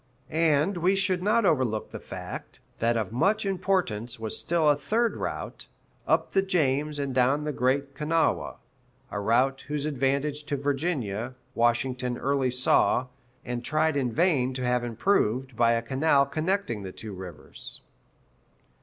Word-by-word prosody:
And 160 +3 +2
we 180 +3 +3
should 190 -2 0
not 215 +3 +3
overlook 130 - +1
the - - -6
fact, - - -8 0.2
that 115 +1 +2
of 110 -3 -2
much 195 - +1
importance 175 - -1
was 110 -1 -3
still 165 -2 +1
a 145 - +6
third 225 - 0
route, - - -5 0.4
up - - +2
the 195 - +3
James 150 -5 0
and 140 -2 -2
down 130 +4 +2
the 150 - -1
Great 140 +2 0
Kanawha; 160 +4 0 0.6
a 105 - -2
route 125 +6 +2
whose 145 0 -2
advantage 140 +1 0
to 145 -1 -2
Virginia, 135 - -2 0.2
Washington 125 +1 +1
early 135 -1 +1
saw, 125 0 +3 0.4
and 120 0 -3
tried 155 +2 +1
in 130 -4 0
vain 135 -4 +2
to 130 -1 -2
have 125 0 +1
improved 125 - 0
by 115 0 +4
a 115 0 0
canal 140 +3 +3
connecting 155 - -1
the 95 -1 -6
two 105 +2 -8
rivers. 90 -5 -6
135 Hz, 150 wpm, -27 LUFS, 120-160 Hz, 0.6 s, a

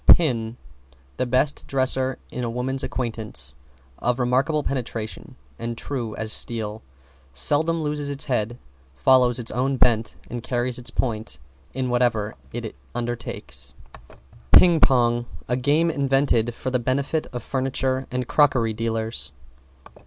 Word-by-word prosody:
=PIN= 120 -8 +5 0.6
The 125 - 0
best 130 +4 +1
dresser 130 -1 +1
in 125 - -4
a 120 - -1
woman's 130 +3 -2
acquaintance 110 - -2 0.5
of 125 0 +1
remarkable 135 +5 +1
penetration 115 -5 -4 0.2
and 115 0 -4
true 120 -6 -4
as 110 0 0
steel, 110 -2 0 0.5
seldom 160 - +2
loses 150 -1 -2
its 140 -1 0
head, 120 -3 -1 0.4
follows 125 - +4
its 120 -2 0
own 130 +3 0
bent 115 -3 +3
and 120 0 -5
carries 125 0 -1
its 125 - 0
point 110 - -2 0.4
in 130 -1 -1
whatever 115 -4 +1 0.2
it - - -5 0.2
undertakes. 120 -1 -4 0.8
=PING 175 -3 +8
PONG= 120 -3 +3 0.2
A 125 - +1
game 145 +6 +2
invented 135 -5 +2
for 130 - -3
the 125 - +2
benefit 140 +5 -1
of 120 -2 -5
furniture 130 0 -1
and 125 -1 -2
crockery 130 -7 +3
dealers. 110 - -1
125 Hz, 130 wpm, -24 LUFS, 115-135 Hz, 0.8 s, =PING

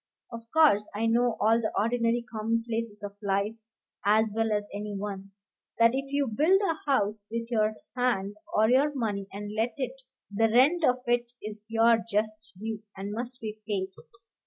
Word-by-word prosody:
Of 230 -1 -9
course 290 -11 +4
I 220 +2 0
know 235 0 +2
all 225 +2 +4
the 220 - -1
ordinary 230 +2 +1
commonplaces 225 -1 -2
of 200 0 -7
life 200 +1 0 0.5
as 215 +1 +3
well 225 0 +1
as 205 -1 0
any 205 0 -4
one, 195 -1 -5 0.5
that 230 0 +6
if 270 +1 -3
you 285 0 +2
build 310 - +3
a 330 -7 -2
house 210 -4 0
with 230 +1 -4
your 215 -1 +2 0.2
hand 210 -6 0 0.2
or 215 +1 +5
your 270 +5 +4
money, 205 -6 -2
and 205 +1 -6
let 225 +2 -1
it, 260 0 -4 0.3
the 225 +2 +3
rent 285 +9 +4
of 250 -3 +2
it 240 0 +1 0.2
is 215 0 -8
your 225 0 +4
just 215 +1 -2
due; 220 +1 -4 0.2
and 195 +1 -5
must 245 +3 -5
be 215 -1 -5
paid. 195 -3 -1
225 Hz, 175 wpm, -28 LUFS, 210-240 Hz, 0.5 s, that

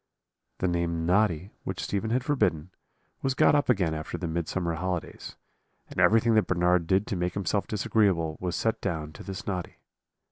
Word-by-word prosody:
"The 90 - 0
name 85 -1 -1
Noddy, 90 -1 +2
which - - -4
Stephen 100 +2 -2
had 125 +2 +1
forbidden, 95 - 0 0.5
was 135 -1 0
got - - +5
up 145 -2 +2
again 95 -9 +2
after 80 0 -4
the 90 - -4
Midsummer 85 +1 -2
holidays; 90 +1 -4 0.5
and - - -5
everything 115 +1 +5
that 110 -1 +3
Bernard 90 -1 +2
did 95 +3 +2
to 100 - -3
make 90 0 -2
himself 100 +1 -1
disagreeable 100 -7 +1
was 90 -1 -2
set 115 0 0
down 80 -5 -3
to - - -11
this 100 +3 -6
Noddy. 90 -4 -4
95 Hz, 175 wpm, -27 LUFS, 85-105 Hz, 0.5 s, got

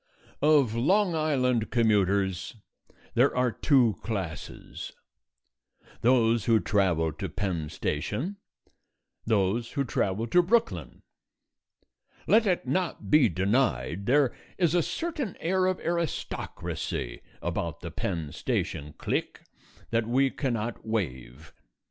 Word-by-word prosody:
Of 145 -6 +4
Long 180 - +2
Island 130 -7 +1
commuters 100 -4 +1 0.6
there 125 +2 +3
are 125 -1 +2
two 120 - +3
classes: 95 -9 -5 1.1
those 115 -2 +3
who 115 -1 +4
travel 85 -4 +1
to 90 +4 -5
Penn 85 -3 -2
Station, 110 - -3 0.9
those 110 +2 +1
who 140 - +1
travel 110 -3 -1
to 175 +10 +4
Brooklyn. 230 +6 0 1.2
Let 220 0 +4
it 180 -7 +1
not 175 +6 -2
be 150 -6 +6
denied, 95 - 0
there 135 0 +3 0.2
is 170 -4 +2
a 175 - +4
certain 300 - -3
air 185 +2 +1
of 185 -1 0
aristocracy 170 - -3 0.2
about - - -3
the - - -6
Penn 80 -6 -3
Station 75 +1 -3
clique - - -2 0.5
that 115 -1 +1
we 130 +3 +2
cannot 120 -5 -3
waive. 70 - -4
115 Hz, 110 wpm, -28 LUFS, 95-150 Hz, 1.2 s, be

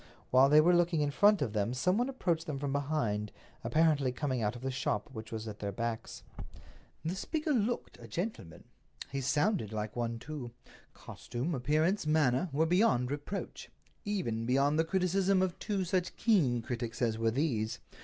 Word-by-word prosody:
While 130 +2 +6
they 150 +1 +7
were 175 +3 +4
looking 175 -2 +2
in 145 -1 +1
front 205 +1 +4
of 110 -6 -3
them 105 +3 0
some 180 +9 +2
one 245 +2 +1
approached 170 -11 -1
them 150 -3 -3
from 140 0 -3
behind, 135 -8 -1 0.3
apparently 155 -5 +2
coming 130 -2 -2
out 105 +2 0
of 120 - -9
the 135 - -1
shop 135 +1 -1
which 110 -2 -8
was 110 0 -5
at 105 -1 -7
their 100 -1 -3
backs. 115 +2 -4 0.8
The 165 - -1
speaker 305 - -2
looked 240 -2 -1
a - - -10
gentleman. 175 - -5 0.5
He 135 0 -2
sounded 145 - +1
like 105 -1 -4
one, 115 -1 -2
too. 125 -2 -7 0.4
Costume, 130 +8 -5
appearance, 155 +7 +1
manner, 155 +1 +2
were 155 +4 +2
beyond 160 - +2
reproach—even 145 - -5
beyond 140 +4 +2
the 165 - +3
criticism 190 +2 +2
of 185 -2 -2
two 200 -3 -1
such 180 0 -1
keen 140 - +2
critics 120 -1 -4
as 115 -3 0
were 115 0 +2
these. 115 -4 -1
145 Hz, 175 wpm, -32 LUFS, 120-180 Hz, 0.8 s, they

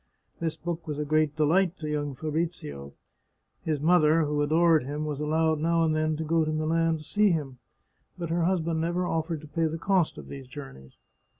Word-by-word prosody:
This 165 -1 -2
book 170 -1 -5
was 150 -2 -3
a 150 - -2
great 155 0 +1
delight 170 +4 +2
to 155 - -6
young 145 -2 -2
Fabrizio. 150 - -4 0.7
His 155 -2 -1
mother, 160 0 +4
who 150 0 0
adored 160 +1 +4
him, 145 +3 -4
was 150 -2 -3
allowed 155 +1 +1
now 165 +1 +2
and 155 -1 +2
then 155 0 0
to 160 - -3
go 165 +1 +2
to 155 - -1
Milan 160 +1 +1
to 155 - -11
see 210 +6 +2
him, 145 -7 -2 0.6
but 170 -2 -4
her 170 0 +1
husband 165 -3 0
never 175 +2 0
offered 160 -2 -2
to 155 - -11
pay 165 +2 0
the 160 +1 -3
cost 185 -1 +1
of - - -9
these 135 -2 -9
journeys. 130 - -11
155 Hz, 200 wpm, -27 LUFS, 150-165 Hz, 0.7 s, mother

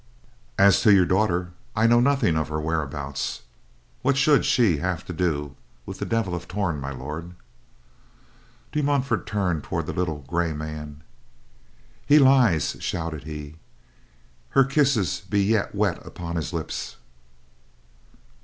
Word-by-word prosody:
As 100 -1 +5
to 110 - +5
your 95 -3 +6
daughter: 90 -2 +1 0.2
I 110 - +2
know 120 +1 +5
nothing 130 - +2
of 80 -1 0
her 80 0 -2
whereabouts. 75 -5 -3 0.6
What 135 +1 +2
should 145 +1 +4
she 105 -10 +3
have 90 +2 -3
to 90 - -6
do 75 -5 -2 0.3
with - - -8
the - - -3
Devil 115 -6 -1
of 90 - -5
Torn, 90 -5 -2
My 70 0 -5
Lord?" 75 +6 -7 1.4
De 150 - 0
Montfort 135 -8 0
turned 90 -7 -1
toward - - -3
the - - -4
little 80 -5 -2
gray 85 +3 -1
man. 75 -1 -7 1.0
"He 145 - +5
lies," 130 - +4
shouted 80 -5 -4
he. 75 -1 -8 0.9
"Her 135 - +5
kisses 135 - +1
be 100 -1 +2
yet 105 0 0
wet 100 -3 0
upon 85 -1 -7
his 80 - -3
lips." 85 -3 -5
90 Hz, 140 wpm, -24 LUFS, 80-110 Hz, 1.4 s, your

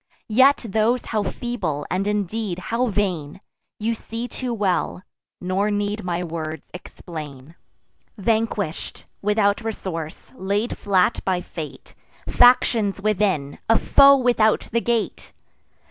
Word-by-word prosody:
Yet 265 +2 +5
those 220 +4 +1
how 215 -2 -1
feeble, 205 - -3
and, 190 +2 0
indeed, 210 -1 -2 0.2
how 250 +2 +2
vain, 185 -7 -2 0.4
You 225 +2 0
see 230 +1 -6
too 250 0 -4
well; 195 -4 -1 0.4
nor 190 +3 0
need 205 +1 -2
my 175 0 -2
words 160 -2 -5
explain. 155 -5 -9 0.6
Vanquish'd 215 -4 -1 0.2
without 205 +1 +2
resource; 170 -8 -5
laid 200 +5 -1
flat 195 +1 +1
by 185 -2 0
fate; 155 -5 -9 0.3
Factions 235 -5 +4
within, 195 -9 0
a 225 - +6
foe 280 0 +6
without 240 -4 +2
the 235 - +1
gate! 235 -2 -2
205 Hz, 115 wpm, -22 LUFS, 180-225 Hz, 0.6 s, a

